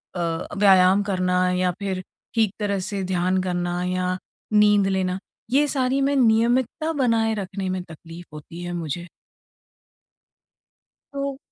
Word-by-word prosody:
अ, 165 -2 -2
व्यायाम 195 0 +5
करना 185 -2 0
या 180 0 +1
फिर 190 -2 -3 0.3
ठीक 220 -3 +2
तरह 200 -2 -1
से 195 +1 -3
ध्यान 185 0 0
करना 175 -1 -2
या 185 0 -1 0.4
नींद 210 -2 +5
लेना, 190 -1 -1 0.3
ये 290 +2 +4
सारी 270 0 0
मैं 280 +1 +2
नियमितता 245 +5 +2
बनाए 230 -5 +2
रखने 190 -1 -4
में 185 0 -2
तकलीफ़ 165 +1 -12
होती 165 +3 -9
है 175 0 -4
मुझे। 170 +1 -4 2.1
तो 275 -1 -3
190 Hz, 130 wpm, -23 LUFS, 180-225 Hz, 2.1 s, व्यायाम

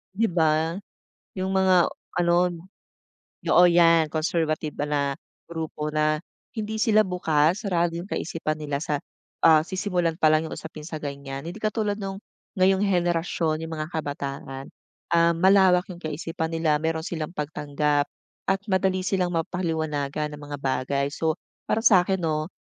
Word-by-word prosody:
Di 225 -2 +1
ba? 160 +1 +1 0.6
Yung 190 0 -2
mga 190 -2 +4 0.2
ano 170 -1 +3 1.1
oo 180 - +6
'yan. 170 -2 +5
Conservative 155 -1 -1
ba 145 - -3
na 145 -1 +1 0.4
grupo 160 -2 -4
na 155 0 +2 0.4
hindi 220 0 -3
sila 215 -1 +4
bukas, 170 -2 +1
sarado 175 -3 +1
yung 175 +3 -6
kaisipan 155 -4 -2
nila 145 -2 -3
sa, 150 -2 -2 0.4
ah, 160 -2 +8
sisimulan 180 -3 -1
palang 155 0 +4
yung - - -9
usapin 155 -1 -9
sa 155 0 -6
ganyan. 140 -1 -6
Hindi 175 - -7
katulad 215 -1 -1
nung 195 0 -5 0.4
ngayong 190 +1 +4
henerasyon, 170 -3 0
yung 160 - -7
mga 155 0 -4
kabataan. 140 -3 -5 0.4
Ah, 170 0 +5
malawak 190 0 +5
yung 175 - -11
kaisipan 160 +1 -4
nila, 160 -2 +2
meron 160 0 -1
silang 160 -2 -4
pagtanggap 150 -1 0 0.4
at 195 0 +2
madali 190 -1 +1
silang 185 -2 0
mapaliwanagan 155 -4 -2
ng - - -13
mga 145 0 -6
bagay. 140 +1 0
So, 160 0 0 0.3
para 225 - 0
sa'kin 190 -4 +5
'no, 155 -2 -1
165 Hz, 145 wpm, -25 LUFS, 155-180 Hz, 1.1 s, ah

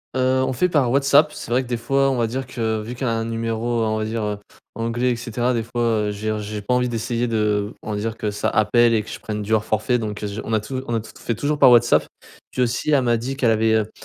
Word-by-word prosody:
Heu, 130 0 +2
on 130 - -1
fait 180 +8 +1
par 140 -7 +2
WhatsApp, 140 +3 +4
c'est - - -8
vrai 125 +2 +3
que - - -11
des 120 -1 -1
fois, 135 +3 +1
on 135 - 0
va 120 - +2
dire 130 +3 -4
que 110 -4 -2
vu 115 +3 -7
qu'elle 130 +1 -3
a 115 - +1
un 115 - -2
numéro, 115 0 -1
on 110 0 0
va 110 - -2
dire, 110 0 -3
heu, 105 -1 -2 0.4
anglais 115 +3 -1
et - - 0
cetera 120 +2 -1
des 115 - 0
fois, 120 +1 -4 0.3
heu, 105 - -1
je - - -6
veux 110 - +1
dire - - -4
j'ai 105 0 -5
pas 115 - 0
envie 125 0 +1
d'essayer 120 +1 -1
de 105 -2 0
on 110 - -5
va 105 - -2
dire 110 +2 -3
que 105 -1 -2
ça 100 - -2
appelle 115 +2 +3
et 110 - +1
que 110 - -12
je - - -7
prenne 105 -1 -4
du 110 +2 -2
hors 110 - +3
forfait 110 +3 +1
donc, 105 -1 -5
heu, 105 - -1
je 100 +2 -5
on 110 - -4
a 110 - +3
tout 130 +5 -5
on 120 - -1
a 115 - +1
tout 110 - -12
t - - -17
fait 115 - -2
toujours 145 +6 -1
par - - +8
WhatsApp. 120 -1 +5 0.4
Puis 125 - +1
aussi 125 +5 -1
elle 140 -3 +4
m'a 120 -1 +2
dit 130 +4 -4
qu'elle 120 -5 +3
avait, 110 0 +2
heu, 110 0 0
115 Hz, 310 wpm, -22 LUFS, 110-125 Hz, 0.4 s, par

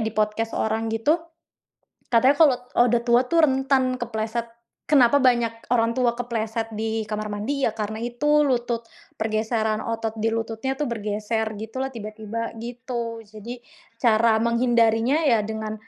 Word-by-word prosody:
di 220 - -2
podcast 215 +1 -1
orang 220 +1 -1
gitu. 260 +9 +2 1.0
Katanya, 255 +5 +5
kalau 290 -6 +6 0.3
udah 240 0 +2
tua 240 +1 +5
tuh 330 -2 +5
rentan 265 -1 +1
kepleset. 225 0 -3 0.4
Kenapa 280 -2 +5
banyak 235 -3 +1
orang 230 +1 +1
tua 240 -2 +2
kepleset 225 -1 -3
di 220 0 -1
kamar 215 0 -3
mandi 265 +7 -1
ya 220 - -1
karena 215 0 -4
itu 295 +6 +2
lutut, 240 -3 -1 0.3
pergeseran 220 0 0
otot 225 -1 -3
di 225 +1 +1
lututnya 225 +4 -3
tuh 295 - -1
bergeser 215 -1 -2
gitulah 260 +5 -4
tiba-tiba, 220 -1 -6
gitu. 235 -1 -5
Jadi 215 +4 -9 0.4
cara 225 -1 +4
menghindarinya, 235 +4 +2
ya 230 -5 +4
dengan 220 0 -4
230 Hz, 140 wpm, -24 LUFS, 220-245 Hz, 1.0 s, kalau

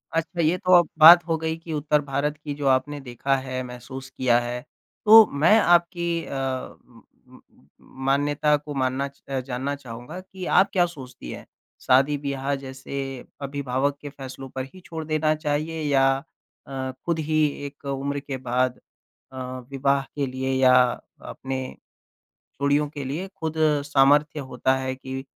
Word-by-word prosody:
अच्छा 165 +1 -1
ये 165 +3 +2
तो 185 -2 -1
अब 175 - +3
बात 170 +2 +10
हो 165 -1 +1
गई 160 0 -2
कि 165 -1 -8
उत्तर 150 0 +1
भारत 145 +2 -2
की 145 -2 -4
जो 145 -1 -2
आपने 135 +3 +1
देखा 135 +2 -1
है 130 0 -3
महसूस 125 +2 -9
किया 125 -2 +2
है। 120 +1 -4 0.4
तो 220 +1 +10 0.2
मैं 210 +8 +6
आपकी 170 -2 +2
अ, - - -6
उ 130 -1 -5 0.3
उ - - -16
उ - - -21 0.7
मान्यता 145 +2 +2
को 150 0 -8
मानना 130 +1 -1
चा 140 -1 -7
अ, - - +1
जानना 135 +2 -3
चाहूँगा 125 +4 -9
कि 190 0 -9
आप 190 - +4
क्या 175 -2 +4
सोचती 130 - -9
हैं - - -9 0.4
शादी 135 +3 +3
ब्याह 140 0 -3
जैसे 135 +1 -8 0.5
अभिभावक 140 0 -1
के 145 - -7
फ़ैसलों 135 -1 -9
पर 130 0 -5
ही 185 - -12
छोड़ 160 -1 -6
देना 155 0 +1
चाहिए 155 +1 -2
या 135 -2 +3 0.6
अ, 140 - -11 0.2
ख़ुद 160 +6 -3
ही 155 -1 +3 0.2
एक 140 0 -10
उम्र 140 +1 -3
के 140 -1 -6
बाद 125 0 -1 0.5
अ, 130 - -10 0.3
विवाह 140 0 +1
के 145 - 0
लिए 130 +1 -2
या 130 -1 +6 0.6
अपने 130 0 -4 1.0
जोड़ियों 145 +1 +2
के 145 -2 -7
लिए 155 +8 -4
ख़ुद 160 -4 -5 0.3
सामर्थ्य 145 +2 +3
होता 130 +1 +2
है 130 0 -3
कि 130 0 -6
140 Hz, 165 wpm, -24 LUFS, 130-155 Hz, 1.0 s, बात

